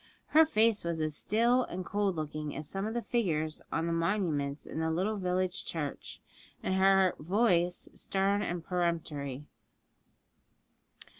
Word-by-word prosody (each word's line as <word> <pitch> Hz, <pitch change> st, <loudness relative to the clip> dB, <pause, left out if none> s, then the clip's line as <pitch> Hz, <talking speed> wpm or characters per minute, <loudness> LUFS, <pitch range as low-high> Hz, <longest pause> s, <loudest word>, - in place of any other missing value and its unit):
Her 315 Hz, +1 st, +6 dB
face 225 Hz, -6 st, +3 dB
was 170 Hz, -1 st, -2 dB
as 155 Hz, -1 st, -1 dB
still 235 Hz, +9 st, +3 dB
and 185 Hz, +1 st, -6 dB
cold 200 Hz, 0 st, 0 dB
looking 155 Hz, -1 st, -4 dB
as 150 Hz, +1 st, -5 dB
some 195 Hz, +5 st, -3 dB
of 220 Hz, -, -4 dB
the 240 Hz, -, -1 dB
figures 160 Hz, -10 st, -1 dB
on 165 Hz, -, 0 dB
the 170 Hz, -, 0 dB
monuments 165 Hz, -5 st, -1 dB
in -, -, -5 dB
the 160 Hz, 0 st, 0 dB
little 190 Hz, +7 st, 0 dB
village 185 Hz, 0 st, 0 dB
church, 150 Hz, -4 st, -5 dB, 0.4 s
and -, -, 0 dB
her 190 Hz, -1 st, +4 dB
voice 180 Hz, 0 st, +1 dB
stern 200 Hz, +1 st, 0 dB
and 175 Hz, -4 st, -3 dB
peremptory. 155 Hz, -6 st, -2 dB
180 Hz, 145 wpm, -31 LUFS, 155-200 Hz, 0.4 s, Her